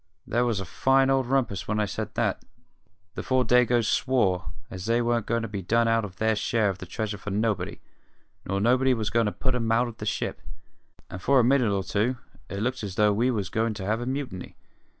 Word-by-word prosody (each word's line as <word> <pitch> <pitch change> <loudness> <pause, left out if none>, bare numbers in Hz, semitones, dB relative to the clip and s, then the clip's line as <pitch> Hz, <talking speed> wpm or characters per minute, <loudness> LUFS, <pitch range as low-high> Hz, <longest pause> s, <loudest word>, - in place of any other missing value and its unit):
"There 120 +2 +1
was 115 -5 0
a 95 - -4
fine 135 +8 +2
old 135 -2 +2
rumpus 120 -7 0
when 105 0 0
I 105 - +2
said 100 - -5
that. - - 0 0.7
The - - -5
four 130 -1 +1
Dagoes 120 -2 +3
swore 95 -9 +1 0.2
as 95 +2 -6
they 115 +1 +3
wasn't 120 -2 0
goin' 115 0 0
to - - -3
be 100 -3 -5
done 115 +5 +2
out 115 0 +2
of 95 -3 -7
their 110 +3 +1
share 105 0 +1
of 95 - -9
the 95 - -8
treasure 105 +2 -4
for 105 - -6
nobody, 105 -2 -1 0.6
nor 95 +1 -2
nobody 130 +4 +3
wasn't 110 -2 -3
goin' 115 -1 +3
to - - 0
put 130 +4 -2
'em 115 -2 -1
out 120 +2 +3
of 115 -2 -9
the - - -5
ship; - - -2 0.7
and 95 - -7
for 135 +8 +4
a - - +5
minute 125 -3 +3
or 100 -1 0
two 110 +6 0 0.3
it 100 +1 -4
looked 130 +2 -1
as 100 -3 -5
though 105 0 +4
we 120 +5 +2
was 105 -6 -1
goin' 110 +1 0
to 95 - -6
have 110 +3 0
a 120 - -4
mutiny. 130 -9 -5
115 Hz, 230 wpm, -26 LUFS, 100-125 Hz, 0.7 s, a